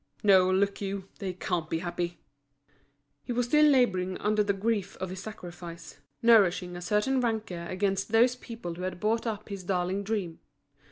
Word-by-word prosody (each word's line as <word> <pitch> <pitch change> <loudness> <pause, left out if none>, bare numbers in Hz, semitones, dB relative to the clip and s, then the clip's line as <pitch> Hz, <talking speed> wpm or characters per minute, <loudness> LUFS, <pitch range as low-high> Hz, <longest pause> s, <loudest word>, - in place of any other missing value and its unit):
No, 190 -3 +6
look 200 +2 +1
you, 195 -1 -4
they 190 -3 -3
can't 175 -3 -2
be 165 - 0
happy." 175 0 -3 1.1
He - - -5
was 245 0 +1
still 300 +5 +5
labouring 190 -10 +2
under 210 0 +1
the 200 - +1
grief 200 0 -1
of 185 -1 -4
his 185 0 -6
sacrifice, 175 -6 -9 0.2
nourishing 185 -6 +4
a 175 - -6
certain 210 +8 +1
rancour 215 -8 -2
against 195 +2 -1
those 240 +3 +5
people 230 -8 -7
who 175 - -8
had 185 -1 -4
bought 225 +3 0
up 215 -1 -4
his 200 -2 -6
darling 185 +1 -1
dream. 195 -6 -3
195 Hz, 170 wpm, -28 LUFS, 180-220 Hz, 1.1 s, No